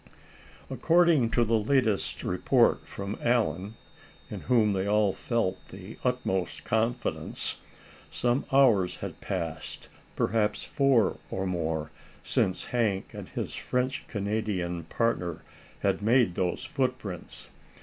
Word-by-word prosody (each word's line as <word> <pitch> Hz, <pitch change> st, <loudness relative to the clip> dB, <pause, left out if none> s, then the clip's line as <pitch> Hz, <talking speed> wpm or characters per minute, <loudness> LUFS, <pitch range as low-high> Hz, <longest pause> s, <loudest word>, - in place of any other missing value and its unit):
According 170 Hz, -7 st, +4 dB
to 120 Hz, -, +2 dB
the 115 Hz, 0 st, +2 dB
latest 110 Hz, -2 st, +1 dB
report -, -, +2 dB
from 100 Hz, +1 st, -5 dB
Allan, 110 Hz, -4 st, +1 dB, 0.6 s
in -, -, -4 dB
whom 110 Hz, -5 st, +3 dB
they 95 Hz, 0 st, -1 dB
all 105 Hz, -1 st, +3 dB
felt 115 Hz, -6 st, -1 dB
the 95 Hz, +3 st, -10 dB
utmost 125 Hz, -8 st, -1 dB
confidence, 115 Hz, +3 st, -1 dB, 0.5 s
some 120 Hz, +2 st, 0 dB
hours 115 Hz, -10 st, +4 dB
had -, -, -7 dB
passed, -, -, -4 dB, 0.3 s
perhaps 105 Hz, 0 st, +1 dB
four 135 Hz, -7 st, +2 dB
or 95 Hz, -, -2 dB
more, 80 Hz, -4 st, -2 dB, 0.3 s
since 95 Hz, -, 0 dB
Hank 110 Hz, -6 st, -1 dB
and -, -, -8 dB
his -, -, -4 dB
French 125 Hz, +1 st, -2 dB
Canadian 100 Hz, -5 st, -2 dB
partner 90 Hz, -4 st, -1 dB, 0.4 s
had 100 Hz, 0 st, +1 dB
made 115 Hz, -3 st, +4 dB
those 90 Hz, 0 st, -1 dB
footprints. 125 Hz, -, -3 dB
110 Hz, 115 wpm, -28 LUFS, 95-125 Hz, 0.6 s, According